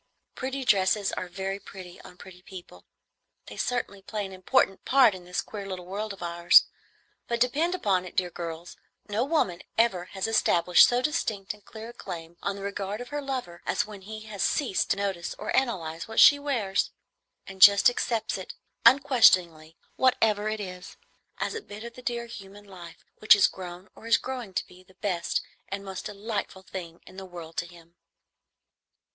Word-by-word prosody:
Pretty 265 Hz, +1 st, -4 dB
dresses 200 Hz, -1 st, +3 dB
are 185 Hz, -, -4 dB
very 195 Hz, +2 st, -4 dB
pretty 185 Hz, -3 st, -11 dB
on 180 Hz, -, -14 dB
pretty 180 Hz, -1 st, -13 dB
people, 180 Hz, -, -12 dB, 0.6 s
they 105 Hz, -, -10 dB
certainly 200 Hz, -, -2 dB
play 210 Hz, +1 st, -4 dB
an 190 Hz, -, -8 dB
important 190 Hz, +1 st, +1 dB
part 260 Hz, -5 st, +5 dB
in 180 Hz, -1 st, -10 dB
this 180 Hz, 0 st, -2 dB
queer 205 Hz, -2 st, -7 dB
little 185 Hz, -2 st, -6 dB
world 205 Hz, +4 st, -4 dB
of 195 Hz, -2 st, -8 dB
ours; 170 Hz, 0 st, +6 dB, 0.6 s
but 235 Hz, 0 st, -1 dB
depend 300 Hz, +9 st, +1 dB
upon 195 Hz, -, +1 dB
it, 185 Hz, -, -10 dB
dear 180 Hz, -1 st, 0 dB
girls, 170 Hz, 0 st, -7 dB, 0.3 s
no 210 Hz, +3 st, 0 dB
woman 255 Hz, -, 0 dB, 0.2 s
ever 195 Hz, -6 st, +2 dB
has 190 Hz, +1 st, -4 dB
established 180 Hz, -5 st, +5 dB
so 245 Hz, 0 st, 0 dB
distinct 215 Hz, -10 st, -1 dB
and 210 Hz, -1 st, -20 dB
clear 220 Hz, +1 st, -9 dB
a -, -, -10 dB
claim 170 Hz, -7 st, -8 dB
on 200 Hz, -, -2 dB
the 200 Hz, -, -8 dB
regard 200 Hz, +1 st, -4 dB
of 245 Hz, -, -8 dB
her 290 Hz, 0 st, -3 dB
lover 255 Hz, -11 st, -5 dB
as 235 Hz, -, +1 dB
when 210 Hz, -2 st, -11 dB
he 215 Hz, +3 st, -8 dB
has 215 Hz, -3 st, -7 dB
ceased 260 Hz, -11 st, +1 dB
to -, -, +1 dB
notice 195 Hz, -4 st, -3 dB
or -, -, -3 dB
analyze 170 Hz, -11 st, -1 dB
what 225 Hz, -, -1 dB
she 285 Hz, -, +8 dB
wears, 235 Hz, -10 st, 0 dB, 0.6 s
and 190 Hz, -1 st, -11 dB
just 200 Hz, 0 st, +9 dB
accepts 230 Hz, -2 st, 0 dB
it -, -, -8 dB, 0.3 s
unquestioningly, 180 Hz, -, +4 dB, 0.2 s
whatever 215 Hz, -5 st, +2 dB
it 215 Hz, 0 st, -3 dB
is, 180 Hz, -1 st, -8 dB, 0.4 s
as -, -, -2 dB
a 450 Hz, -, -5 dB
bit 210 Hz, -, -10 dB
of 235 Hz, 0 st, -8 dB
the 250 Hz, -, -12 dB
dear 240 Hz, -1 st, -3 dB
human 205 Hz, -3 st, -11 dB
life 175 Hz, -4 st, -12 dB
which 215 Hz, -, +8 dB
has 205 Hz, -2 st, +5 dB
grown 180 Hz, 0 st, -5 dB
or 225 Hz, -, -12 dB
is 230 Hz, -, +5 dB
growing 250 Hz, -6 st, -6 dB
to -, -, -2 dB
be 180 Hz, 0 st, -17 dB
the 185 Hz, 0 st, -23 dB
best 180 Hz, -5 st, -1 dB, 0.3 s
and 195 Hz, +1 st, -5 dB
most 190 Hz, -1 st, -6 dB
delightful 205 Hz, -2 st, -5 dB
thing 170 Hz, -2 st, -8 dB
in 185 Hz, -, -14 dB
the 195 Hz, -, -6 dB
world 170 Hz, -2 st, -10 dB
to 175 Hz, -, -2 dB
him. 170 Hz, -1 st, -17 dB
195 Hz, 185 wpm, -27 LUFS, 180-225 Hz, 0.6 s, just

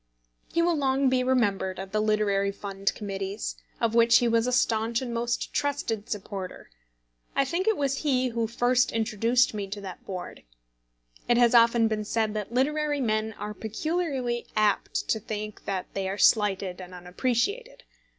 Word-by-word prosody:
He 335 Hz, -, +2 dB
will 345 Hz, 0 st, +2 dB
long 270 Hz, -2 st, +2 dB
be 255 Hz, 0 st, +2 dB
remembered 205 Hz, -7 st, +1 dB
at 190 Hz, 0 st, -7 dB
the 215 Hz, +1 st, +1 dB
Literary 205 Hz, -2 st, +1 dB
Fund 195 Hz, 0 st, -2 dB
Committees, 195 Hz, 0 st, -4 dB, 0.2 s
of 230 Hz, -1 st, +1 dB
which 230 Hz, 0 st, +6 dB
he 240 Hz, -, +2 dB
was 230 Hz, +1 st, +2 dB
a -, -, +1 dB
staunch 230 Hz, -2 st, +1 dB
and 245 Hz, -3 st, -5 dB
most 235 Hz, +1 st, -2 dB
trusted 280 Hz, -7 st, -2 dB
supporter. 195 Hz, -2 st, -6 dB, 0.6 s
I 275 Hz, -, +3 dB
think 345 Hz, +8 st, -2 dB
it 440 Hz, -, +3 dB
was 275 Hz, -1 st, 0 dB
he 260 Hz, -4 st, +1 dB
who 230 Hz, -1 st, -1 dB
first 245 Hz, +2 st, +2 dB
introduced 230 Hz, +2 st, +2 dB
me 205 Hz, -2 st, -4 dB
to 200 Hz, +1 st, -6 dB
that 190 Hz, -3 st, -8 dB
board. 185 Hz, -2 st, -7 dB, 0.9 s
It 240 Hz, -, +5 dB
has 240 Hz, 0 st, +5 dB
often 230 Hz, -1 st, +5 dB
been 215 Hz, -1 st, -2 dB
said 215 Hz, 0 st, 0 dB
that 215 Hz, 0 st, -4 dB
literary 295 Hz, +3 st, +1 dB
men 220 Hz, -3 st, 0 dB
are 210 Hz, +1 st, -6 dB
peculiarly 255 Hz, +1 st, -2 dB
apt 215 Hz, -, +1 dB
to 220 Hz, -, +1 dB
think 215 Hz, 0 st, -6 dB
that 190 Hz, -2 st, -2 dB
they 195 Hz, -1 st, -2 dB
are 195 Hz, -, -3 dB
slighted 195 Hz, -4 st, +2 dB
and 180 Hz, 0 st, -10 dB
unappreciated. 265 Hz, -, -2 dB
230 Hz, 170 wpm, -27 LUFS, 205-255 Hz, 0.9 s, which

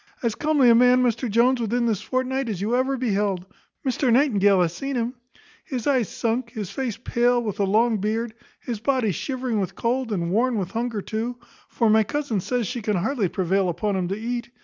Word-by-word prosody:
As 230 Hz, -2 st, +1 dB
comely 300 Hz, -2 st, +2 dB
a -, -, +7 dB
man, 250 Hz, +2 st, +5 dB
Mr 240 Hz, 0 st, 0 dB
Jones, 240 Hz, +4 st, +3 dB
within 235 Hz, +2 st, 0 dB
this 220 Hz, -5 st, 0 dB
fortnight, 260 Hz, 0 st, -1 dB
as 200 Hz, -5 st, -3 dB
you 215 Hz, +5 st, 0 dB
ever 265 Hz, +2 st, +1 dB
beheld; 200 Hz, -6 st, 0 dB, 0.4 s
Mr 260 Hz, 0 st, +1 dB
Nightingale 205 Hz, -7 st, +4 dB
hath 170 Hz, -2 st, +2 dB
seen 275 Hz, +10 st, -4 dB
him. 240 Hz, 0 st, -1 dB, 0.5 s
His 260 Hz, -, -5 dB
eyes 260 Hz, -7 st, +2 dB
sunk, 235 Hz, +1 st, -2 dB
his 210 Hz, -6 st, -5 dB
face 255 Hz, -6 st, -3 dB
pale, 240 Hz, +1 st, +1 dB
with 210 Hz, -3 st, -4 dB
a 200 Hz, -, +3 dB
long 220 Hz, +3 st, +2 dB
beard. 220 Hz, +3 st, -2 dB, 0.3 s
His 235 Hz, -4 st, -4 dB
body 245 Hz, -2 st, +1 dB
shivering 255 Hz, -, -2 dB
with 190 Hz, -, -3 dB
cold, 245 Hz, 0 st, -1 dB
and 170 Hz, -4 st, -1 dB
worn 240 Hz, +5 st, +2 dB
with 190 Hz, -4 st, -3 dB
hunger 230 Hz, -3 st, -2 dB
too; 230 Hz, +3 st, -3 dB, 0.3 s
for 230 Hz, -, 0 dB
my 220 Hz, 0 st, +5 dB
cousin 280 Hz, -2 st, -2 dB
says 245 Hz, +5 st, -1 dB
she 240 Hz, +3 st, -4 dB
can 210 Hz, 0 st, 0 dB
hardly 215 Hz, +3 st, 0 dB
prevail 190 Hz, +1 st, +1 dB
upon 200 Hz, +4 st, -1 dB
him 185 Hz, -2 st, -1 dB
to 195 Hz, +3 st, -3 dB
eat. 240 Hz, +1 st, -4 dB
230 Hz, 205 wpm, -24 LUFS, 205-250 Hz, 0.5 s, a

